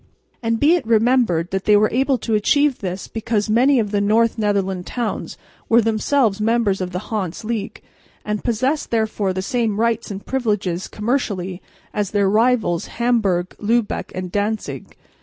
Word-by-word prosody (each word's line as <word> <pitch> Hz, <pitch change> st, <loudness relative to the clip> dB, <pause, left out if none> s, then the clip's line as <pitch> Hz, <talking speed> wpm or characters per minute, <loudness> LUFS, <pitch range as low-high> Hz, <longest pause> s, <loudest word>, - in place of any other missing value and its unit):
And 230 Hz, -1 st, 0 dB
be 300 Hz, +4 st, +5 dB
it 340 Hz, -10 st, 0 dB
remembered 225 Hz, -7 st, +2 dB
that 190 Hz, 0 st, -2 dB
they 210 Hz, -1 st, +6 dB
were 215 Hz, +1 st, +3 dB
able 265 Hz, +2 st, +2 dB
to 230 Hz, -, -3 dB
achieve 285 Hz, +6 st, +2 dB
this 185 Hz, -1 st, -5 dB
because 220 Hz, -1 st, -2 dB
many 255 Hz, +4 st, +4 dB
of 210 Hz, -3 st, -1 dB
the 205 Hz, -1 st, +1 dB
North 220 Hz, +3 st, +3 dB
Netherland 195 Hz, -3 st, -1 dB
towns 240 Hz, -3 st, -4 dB, 0.3 s
were 230 Hz, -, +6 dB
themselves 225 Hz, 0 st, +1 dB
members 220 Hz, -3 st, +1 dB
of 185 Hz, -, -2 dB
the 180 Hz, +3 st, -6 dB
Hanse 190 Hz, -2 st, -3 dB
League, 220 Hz, -2 st, -4 dB, 0.4 s
and 210 Hz, -1 st, -2 dB
possessed 255 Hz, +6 st, 0 dB
therefore 220 Hz, -3 st, 0 dB
the 185 Hz, 0 st, -3 dB
same 225 Hz, -1 st, -1 dB
rights 230 Hz, 0 st, 0 dB
and 200 Hz, -1 st, -7 dB
privileges 205 Hz, -8 st, -1 dB
commercially 205 Hz, -6 st, -2 dB, 0.3 s
as 205 Hz, -2 st, -1 dB
their 200 Hz, -2 st, +1 dB
rivals, 220 Hz, -6 st, +2 dB
Hamburg, 210 Hz, -7 st, +1 dB
Lübeck 225 Hz, +1 st, 0 dB
or 185 Hz, -, -2 dB
Danzig. 205 Hz, +4 st, -3 dB
215 Hz, 160 wpm, -20 LUFS, 200-235 Hz, 0.4 s, they